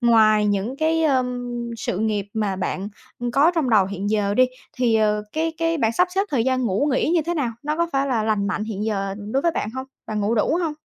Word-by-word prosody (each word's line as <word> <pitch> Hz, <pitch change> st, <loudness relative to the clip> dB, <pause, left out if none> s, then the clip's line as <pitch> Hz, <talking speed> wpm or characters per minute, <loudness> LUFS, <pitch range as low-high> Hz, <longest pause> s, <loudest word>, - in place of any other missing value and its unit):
ngoài 215 Hz, -3 st, +5 dB
những 205 Hz, +6 st, -1 dB
cái, 320 Hz, +1 st, +1 dB
ờm, 250 Hz, -4 st, 0 dB, 0.3 s
sự 190 Hz, -, -3 dB
nghiệp 210 Hz, -2 st, 0 dB
mà 205 Hz, -3 st, -1 dB
bạn, 190 Hz, +1 st, -3 dB, 0.3 s
ưm, 240 Hz, 0 st, -2 dB
có 285 Hz, +7 st, +4 dB
trong 300 Hz, -7 st, +1 dB
đầu 200 Hz, -4 st, +5 dB
hiện 200 Hz, +1 st, -3 dB
giờ 205 Hz, -2 st, +1 dB
đi, 255 Hz, -, +6 dB, 0.3 s
thì, 245 Hz, -3 st, +2 dB
ờ, 210 Hz, -1 st, +2 dB
cái 320 Hz, +1 st, -1 dB
cái 330 Hz, -1 st, 0 dB
bạn 225 Hz, -2 st, +2 dB
sắp 360 Hz, +7 st, +2 dB
xếp 390 Hz, -, +2 dB
thời 245 Hz, -5 st, +1 dB
gian 260 Hz, 0 st, +1 dB
ngủ 225 Hz, +8 st, +1 dB
nghỉ 260 Hz, -, +1 dB
như 330 Hz, -, +3 dB
thế 345 Hz, +3 st, -2 dB
nào? 275 Hz, -7 st, 0 dB
Nó 300 Hz, +1 st, -2 dB
có 340 Hz, 0 st, +1 dB
phải 275 Hz, 0 st, +1 dB
là 240 Hz, -5 st, 0 dB
lành 215 Hz, -2 st, 0 dB
mạnh 210 Hz, +1 st, -2 dB
hiện 215 Hz, -1 st, -4 dB
giờ 195 Hz, -3 st, -2 dB, 0.2 s
đối 270 Hz, -, +1 dB
với 335 Hz, -1 st, +2 dB
bạn 210 Hz, -, -2 dB
hông? 260 Hz, +2 st, -6 dB, 0.2 s
Bạn 215 Hz, -1 st, -2 dB
ngủ 210 Hz, +3 st, +1 dB
đủ 265 Hz, +9 st, +2 dB
hông? 320 Hz, -, -1 dB
235 Hz, 250 wpm, -22 LUFS, 210-280 Hz, 0.3 s, đi